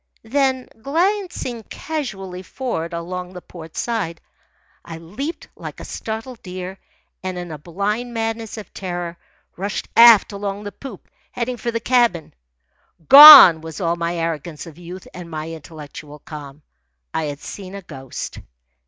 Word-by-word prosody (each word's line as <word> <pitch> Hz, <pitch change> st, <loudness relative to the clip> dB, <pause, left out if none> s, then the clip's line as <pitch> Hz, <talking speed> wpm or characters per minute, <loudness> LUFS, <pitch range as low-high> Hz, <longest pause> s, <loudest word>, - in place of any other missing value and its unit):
Then, 260 Hz, +2 st, 0 dB
glancing 340 Hz, -, -1 dB
casually 200 Hz, -, -6 dB
for'ard, 185 Hz, -5 st, -4 dB
along 180 Hz, +2 st, -6 dB
the 180 Hz, -, -7 dB
port 165 Hz, -2 st, -12 dB
side, 210 Hz, -9 st, -2 dB, 0.6 s
I 165 Hz, -, -8 dB
leaped 210 Hz, -, -6 dB
like -, -, -9 dB
a -, -, -8 dB
startled 225 Hz, +2 st, -6 dB
deer 185 Hz, +1 st, -7 dB, 0.4 s
and 185 Hz, -1 st, -4 dB
in 175 Hz, -1 st, -6 dB
a 155 Hz, -, -7 dB
blind 205 Hz, -, -3 dB
madness 225 Hz, -1 st, -4 dB
of 215 Hz, -, -10 dB
terror 175 Hz, -2 st, -5 dB, 0.4 s
rushed 200 Hz, +3 st, -4 dB
aft 230 Hz, -3 st, +8 dB
along 200 Hz, 0 st, -5 dB
the 205 Hz, -, -6 dB
poop, 250 Hz, -6 st, -11 dB, 0.2 s
heading 245 Hz, +1 st, -3 dB
for 235 Hz, +1 st, -3 dB
the 230 Hz, 0 st, -2 dB
cabin. 235 Hz, -9 st, +1 dB, 0.8 s
Gone 275 Hz, -, +12 dB
was 160 Hz, -1 st, -8 dB
all 170 Hz, -2 st, 0 dB
my 170 Hz, 0 st, -2 dB
arrogance 165 Hz, -1 st, -4 dB
of 165 Hz, -1 st, -13 dB
youth 180 Hz, +2 st, -10 dB
and 175 Hz, -1 st, -9 dB
my 155 Hz, 0 st, -5 dB
intellectual 150 Hz, -2 st, -10 dB
calm. 145 Hz, -1 st, -11 dB, 0.5 s
I 160 Hz, -, -1 dB
had 145 Hz, -1 st, -5 dB
seen 190 Hz, +5 st, -9 dB
a 200 Hz, -, -8 dB
ghost. 135 Hz, -6 st, -8 dB
185 Hz, 145 wpm, -20 LUFS, 165-230 Hz, 0.8 s, Gone